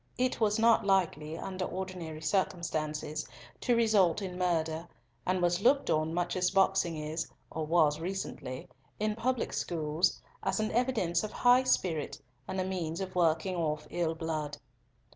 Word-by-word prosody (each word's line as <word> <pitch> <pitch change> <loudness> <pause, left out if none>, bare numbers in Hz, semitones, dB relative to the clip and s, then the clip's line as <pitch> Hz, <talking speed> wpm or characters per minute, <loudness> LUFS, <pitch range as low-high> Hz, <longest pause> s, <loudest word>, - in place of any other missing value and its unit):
It 255 0 0
was 210 -2 +2
not 230 0 +5
likely, 165 -5 +1
under 185 +1 -4
ordinary 180 -4 -5
circumstances, 155 -5 -1 0.3
to 245 - +2
result 210 -7 +4
in 190 -3 -5
murder, 165 -2 0 0.4
and 185 0 +1
was 175 +1 +2
looked 275 +5 +4
on 155 +1 +1
much 175 +1 -1
as 180 -1 +2
boxing 190 -4 +2
is, 155 +2 -3 0.2
or 160 -1 -3
was 155 -2 +3
recently, 165 -7 -5 0.3
in 215 0 0
public 250 +2 -1
schools, 160 +1 0 0.2
as 190 +1 0
an 215 0 0
evidence 230 -8 +1
of 215 - -4
high 250 +1 +5
spirit, 165 - 0 0.3
and 190 - -3
a 185 - 0
means 175 -3 -3
of 190 -1 -4
working 175 +2 +2
off 155 -3 -1
ill 165 -2 0
blood. 155 -3 -3
180 Hz, 155 wpm, -31 LUFS, 160-195 Hz, 0.4 s, not